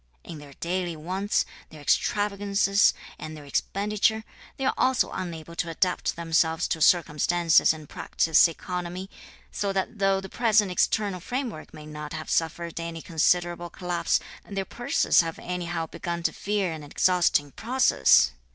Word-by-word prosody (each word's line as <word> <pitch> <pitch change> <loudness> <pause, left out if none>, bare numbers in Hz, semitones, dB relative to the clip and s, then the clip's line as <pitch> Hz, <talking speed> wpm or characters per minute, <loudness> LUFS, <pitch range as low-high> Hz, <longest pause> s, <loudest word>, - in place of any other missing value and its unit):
In 160 - -9
their 145 -1 -13
daily 175 +2 -3
wants, 185 +6 -1 0.2
their 155 - -13
extravagances, 200 +4 +2 0.2
and 155 0 -7
their 145 - -11
expenditure, 210 +8 0 0.3
they 270 - -3
are - - +2
also 260 0 +2
unable 170 -3 -6
to 170 - -1
adapt 180 +2 0
themselves 165 0 +1
to 160 - -2
circumstances 170 +1 +4
and 155 -2 -7
practise 160 +4 +3
economy; 180 +2 -6 0.4
(so 200 -1 -2
that 195 +3 -3
though) 195 -1 +3
the 195 - -7
present 215 -3 +2
external 200 +1 +1
framework 245 - -5
may 155 -1 -11
not 150 -1 -7
have 155 0 -6
suffered 170 +1 -1
any 165 -1 -6
considerable 175 +1 +1
collapse, 175 -1 -1 0.2
their 195 -1 -4
purses 240 -3 +2
have 165 -1 -5
anyhow 175 -2 -3
begun 170 +1 -5
to - - +1
feel 200 -3 -1
an 160 -1 -6
exhausting 150 -1 +2
process! 220 - +4
175 Hz, 145 wpm, -26 LUFS, 160-195 Hz, 0.4 s, circumstances